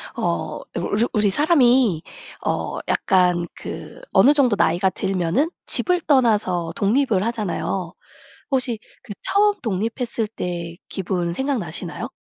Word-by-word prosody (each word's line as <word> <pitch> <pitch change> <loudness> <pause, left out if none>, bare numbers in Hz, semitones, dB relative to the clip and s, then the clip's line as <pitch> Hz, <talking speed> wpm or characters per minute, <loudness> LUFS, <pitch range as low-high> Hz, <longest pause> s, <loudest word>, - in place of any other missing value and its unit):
어 - - -2
울 - - -2
우르 215 +3 +3
우리 210 -3 +3
사람이 250 - +4 0.4
어 - - -1
약간 180 -2 +2
그 - - -8
어느 285 - +6
정도 265 -7 +3
나이가 180 +3 +3
들면은 190 - 0 0.2
집을 360 -1 +1
떠나서 210 - +2
독립을 215 -1 +2
하잖아요. 195 -5 -2 0.6
혹시 250 -4 0 0.2
그 - - -8
처음 415 +1 +3
독립했을 225 +2 -2
때 175 -5 -5
기분 180 -2 -2
생각나시나요? 230 - -3
210 Hz, 260 characters per minute, -22 LUFS, 180-260 Hz, 0.6 s, 어느